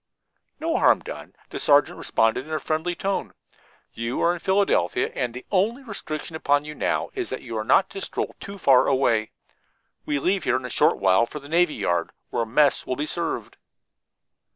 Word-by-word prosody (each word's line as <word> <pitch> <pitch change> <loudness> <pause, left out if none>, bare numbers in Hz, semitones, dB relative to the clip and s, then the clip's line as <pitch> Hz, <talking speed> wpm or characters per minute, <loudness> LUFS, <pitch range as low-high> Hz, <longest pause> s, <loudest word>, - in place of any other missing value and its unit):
"No 325 +2 0
harm - - +4
done," - - -9
the - - -6
sergeant 145 0 +3
responded 115 +5 +1
in - - -10
a 155 - 0
friendly 160 +4 -2
tone. 195 +2 -3 0.6
"You 115 +2 -3
are 170 - +3
in 175 - -6
Philadelphia, 195 +1 +1
and 125 -3 -2
the 125 +2 -9
only 215 +7 +1
restriction 165 - -6
upon 145 -2 +1
you 150 - -6
now - - -1
is 375 -3 -3
that - - -5
you 115 -2 -6
are 110 - -1
not 150 - +4
to 195 - -6
stroll - - -3
too 200 0 -8
far 135 -8 +5
away. 115 -5 +2 0.7
We 145 - -1
leave 185 +7 0
here 125 - +1
in 130 - -6
a 125 - -6
short - - +3
while 95 +4 +3
for 150 - -8
the 140 -1 -10
navy 170 0 +2
yard, 85 -5 0 0.2
where 115 - -1
mess 140 +5 +3
will 130 - -1
be 145 - -2
served." 170 +2 -3
150 Hz, 195 wpm, -24 LUFS, 125-180 Hz, 0.7 s, far